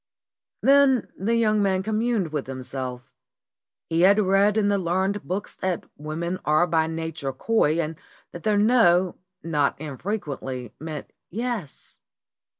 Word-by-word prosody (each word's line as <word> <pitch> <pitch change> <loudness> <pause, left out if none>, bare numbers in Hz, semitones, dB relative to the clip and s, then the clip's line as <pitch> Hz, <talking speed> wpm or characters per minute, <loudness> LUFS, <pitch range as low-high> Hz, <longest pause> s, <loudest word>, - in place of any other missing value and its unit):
Then 275 -3 +5
the 220 +5 0
young 215 -2 +3
man 190 -1 +1
communed 220 -3 0
with 150 -4 -3
himself. 130 -1 -6 0.7
He 165 0 +1
had 200 +3 +6
read 200 +1 +3
in 210 -2 +3
the 200 -1 +2
learned 190 +3 -1
books 190 +3 -4
that 185 -2 -2
women 165 +4 -4
are 155 +3 +3
by 160 -2 +1
na 160 0 -3
ture 140 -3 -4
coy, 160 0 +1
and 160 0 -2 0.4
that 175 - -8
their 210 +2 +2
"no" 190 -5 +4 0.3
not 150 -5 0
infrequently 140 - -5
meant 155 -1 -7 0.2
"yes." 225 - -5
175 Hz, 140 wpm, -25 LUFS, 155-210 Hz, 0.7 s, had